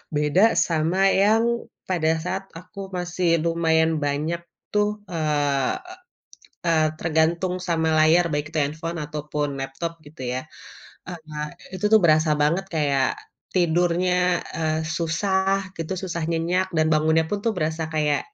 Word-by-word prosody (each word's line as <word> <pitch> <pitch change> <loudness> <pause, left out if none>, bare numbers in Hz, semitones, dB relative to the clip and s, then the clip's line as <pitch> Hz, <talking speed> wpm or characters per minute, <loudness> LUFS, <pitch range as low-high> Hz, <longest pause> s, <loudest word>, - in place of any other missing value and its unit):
Beda 150 +6 +3 0.2
sama 165 +3 0 0.2
yang 220 +2 +4 0.5
pada 160 -3 +2
saat 190 +2 -3 0.2
aku 180 +3 -13 0.2
masih 175 0 -2 0.2
lumayan 165 -1 +2
banyak 150 +4 -1 0.3
tuh, 210 0 +3 0.2
eee 150 - 0 0.9
eee, 160 -2 +4
tergantung 165 +3 +1
sama 160 -2 +1
layar 165 +3 +5
baik 145 0 -1
itu 160 - -1
handphone 160 +3 -4
ataupun 150 0 -3
laptop 135 +5 -4
gitu 145 0 -13
ya. 130 - -2 0.7
Eee, 160 -4 -6 0.3
itu 185 - -6
tuh 220 - +8
berasa 155 -1 +4
banget 170 +6 +1
kayak 140 -3 +2 0.5
tidurnya, 180 +1 +2
eee, 160 -1 0 0.2
susah 190 +3 0
gitu, 165 +2 -3
susah 170 -3 -3
nyenyak 175 +3 0
dan 155 0 +3
bangunnya 160 +1 +3
pun 205 - 0
tuh 230 - +2
berasa 160 -1 -1
kayak 150 -1 +2
165 Hz, 130 wpm, -24 LUFS, 155-180 Hz, 0.9 s, tuh